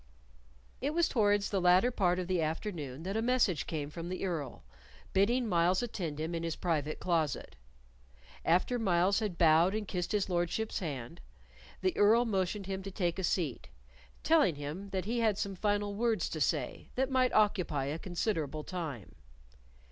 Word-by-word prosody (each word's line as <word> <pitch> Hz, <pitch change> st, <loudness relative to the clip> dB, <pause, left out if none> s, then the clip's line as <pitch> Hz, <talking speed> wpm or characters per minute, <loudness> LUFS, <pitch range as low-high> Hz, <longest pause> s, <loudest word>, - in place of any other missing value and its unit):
It 290 Hz, +4 st, -1 dB
was 340 Hz, -1 st, +3 dB
towards 205 Hz, -3 st, +2 dB
the 195 Hz, -2 st, +1 dB
latter 180 Hz, +7 st, +5 dB
part 180 Hz, -6 st, +1 dB
of 185 Hz, -, -2 dB
the 180 Hz, -1 st, 0 dB
afternoon 155 Hz, -4 st, -4 dB
that 195 Hz, +3 st, -3 dB
a 220 Hz, -, +1 dB
message 235 Hz, -, +1 dB
came 150 Hz, -2 st, -4 dB
from 170 Hz, +2 st, -6 dB
the 185 Hz, +1 st, -3 dB
Earl, 155 Hz, -8 st, -4 dB, 0.5 s
bidding 235 Hz, +6 st, +2 dB
Myles 180 Hz, +1 st, +2 dB
attend 170 Hz, -10 st, -4 dB
him 160 Hz, +2 st, -3 dB
in 165 Hz, -, -2 dB
his 165 Hz, -1 st, -2 dB
private 155 Hz, -4 st, -1 dB
closet. 160 Hz, -, -1 dB, 0.9 s
After 185 Hz, +9 st, +2 dB
Myles 190 Hz, -1 st, +2 dB
had 205 Hz, -6 st, -3 dB
bowed 170 Hz, +4 st, +5 dB
and 215 Hz, -2 st, -3 dB
kissed 180 Hz, -1 st, -3 dB
his 205 Hz, -2 st, +1 dB
lordship's 180 Hz, +5 st, -1 dB
hand, 135 Hz, -, -6 dB, 0.6 s
the 185 Hz, -1 st, +1 dB
Earl 225 Hz, +4 st, +5 dB
motioned 195 Hz, -2 st, -1 dB
him 190 Hz, 0 st, -4 dB
to 195 Hz, -, -6 dB
take 180 Hz, -2 st, -2 dB
a -, -, -2 dB
seat, 145 Hz, -, -1 dB, 0.5 s
telling 300 Hz, -, +4 dB
him 150 Hz, +8 st, -6 dB
that 190 Hz, -2 st, -3 dB
he 235 Hz, +3 st, -1 dB
had 220 Hz, -3 st, +2 dB
some 200 Hz, -1 st, -2 dB
final 205 Hz, +1 st, 0 dB
words 225 Hz, +1 st, 0 dB
to -, -, -4 dB
say -, -, -1 dB
that 265 Hz, +1 st, 0 dB
might 255 Hz, -1 st, +3 dB
occupy 180 Hz, -10 st, +2 dB
a 150 Hz, +4 st, -3 dB
considerable 165 Hz, -5 st, -2 dB
time. 155 Hz, -, -6 dB
185 Hz, 170 wpm, -32 LUFS, 165-210 Hz, 0.9 s, latter